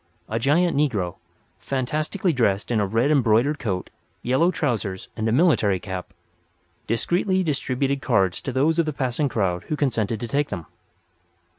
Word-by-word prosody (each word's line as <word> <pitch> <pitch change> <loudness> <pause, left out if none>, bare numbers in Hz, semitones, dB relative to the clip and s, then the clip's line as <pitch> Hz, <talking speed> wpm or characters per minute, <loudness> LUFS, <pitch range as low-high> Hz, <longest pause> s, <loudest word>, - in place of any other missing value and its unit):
A 115 - -2
giant 165 +8 +2
negro, 110 - 0 0.4
fantastically 155 +7 -1
dressed 110 -5 +1
in 115 - +2
a 100 - +1
red 115 +8 +2
embroidered 135 +2 +3
coat, 95 -6 -3 0.3
yellow 135 +8 +3
trousers 115 - -2
and 110 0 -1
a - - +1
military 115 - +3
cap, 95 -1 -6 0.8
discreetly 185 - +1
distributed 140 -3 -1
cards 95 -8 +1
to 135 - -4
those 150 +6 +2
of 165 - +2
the 155 - -1
passing 135 +2 -1
crowd 95 -7 -1
who 155 - -2
consented 115 -7 0
to 120 - -4
take 145 +5 0
them. 85 -2 -5
125 Hz, 155 wpm, -23 LUFS, 110-150 Hz, 0.8 s, embroidered